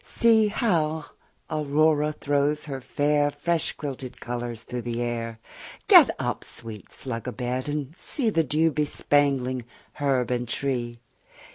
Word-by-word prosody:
See 225 -2 +4
how 160 - 0 0.4
Aurora 150 0 +2
throws 145 0 0
her 135 -3 -5
fair 145 +2 +1
Fresh 160 +3 -1
quilted 135 -3 -6
colours 120 -2 -4
through 125 0 -5
the 120 0 -3
air: 115 -1 -3 0.5
Get - - +9
up, - - -2
sweet 110 -4 -7
slug 120 -2 -5
a - - -1
bed, 125 +2 -3
and 145 +1 -3
see 265 - -3
5 - - -4
The 165 - +3
dew 160 +3 +2
bespangling 140 -4 +1 0.4
herb 135 -4 +1
and 125 -1 -1
tree! 120 -2 -2
140 Hz, 140 wpm, -26 LUFS, 125-150 Hz, 0.5 s, Get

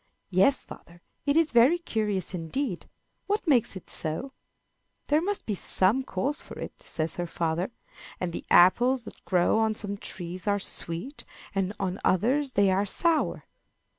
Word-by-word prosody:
"Yes, 195 +9 +3
father, 170 +1 -13 0.2
it 285 +2 +3
is 325 -2 +3
very 245 +8 +5
curious 210 - -2
indeed. 180 - -3 0.4
What 410 -2 -1
makes 250 -9 +3
it 190 - -9
so?" 165 - -1 0.8
"There 300 +2 +4
must 400 +3 -2
be 215 - -1
some 195 +5 +3
cause 265 +5 -2
for - - -11
it" - - -8
says 160 0 -2
her 175 -1 -2
father. 170 +2 -1 0.5
"And 175 -2 -3
the - - -5
apples 245 +8 +5
that - - -12
grow 180 +3 +3
on 220 -1 +1
some 200 -2 -4
trees 180 -1 -5
are 205 0 +3
sweet, 195 - -4 0.3
and 195 -1 0
on 190 -1 -2
others 255 +9 +2
they 200 -1 +4
are 190 +2 +2
sour. 320 - +1
205 Hz, 160 wpm, -27 LUFS, 180-265 Hz, 0.8 s, very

